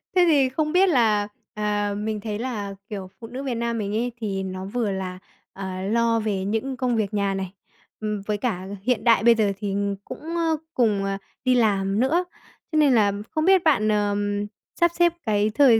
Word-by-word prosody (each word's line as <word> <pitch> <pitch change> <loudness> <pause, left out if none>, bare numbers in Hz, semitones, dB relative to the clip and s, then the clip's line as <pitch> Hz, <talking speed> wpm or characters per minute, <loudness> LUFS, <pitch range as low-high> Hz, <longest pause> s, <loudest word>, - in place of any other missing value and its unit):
Thế 360 -1 +6
thì 280 -5 +4
không 305 +3 -1
biết 370 +3 +5
là, 220 -8 +3 0.3
à, 205 -1 -1
mình 215 0 -2
thấy 210 -1 -4
là, 210 -5 -4
kiểu, 195 -4 -6
phụ 225 - -8
nữ 255 +4 -6
Việt 260 -3 -2
Nam 235 0 -1
mình 205 -2 -2
ấy 240 +2 0
thì 200 -4 -3
nó 185 0 -5
vừa 215 +1 -1
là, 185 -1 -4 0.3
à, 190 -1 -5
lo 230 +3 +2
về 205 -3 -1
những 225 +6 -2
công 250 -2 0
việc 215 -2 -1
nhà 200 -1 +1
này, 190 -1 -4 0.5
ừm, 210 -1 -2
với 210 0 -1
cả 195 -5 -2 0.2
hiện 235 -2 +1
đại 230 -3 +5
bây 235 0 +7
giờ 215 -3 +2
thì 200 -2 -2 0.3
cũng, - - -8 0.2
ờ, 325 -2 +1 0.2
cùng, 210 -5 +2
à, 195 0 -1 0.3
đi 255 0 +4
làm 200 -4 +2
nữa. 320 +9 +2 0.5
Thế 310 - 0
nên 295 -3 +5
là 205 -3 +4 0.2
không 310 -1 0
biết 380 -1 +5
bạn, 275 -9 +3
ờ, 205 -1 +1 0.6
sắp 345 0 +4
xếp 345 -1 +5
cái 210 -1 +2
thời 255 -6 +6
220 Hz, 205 wpm, -24 LUFS, 200-255 Hz, 0.6 s, bây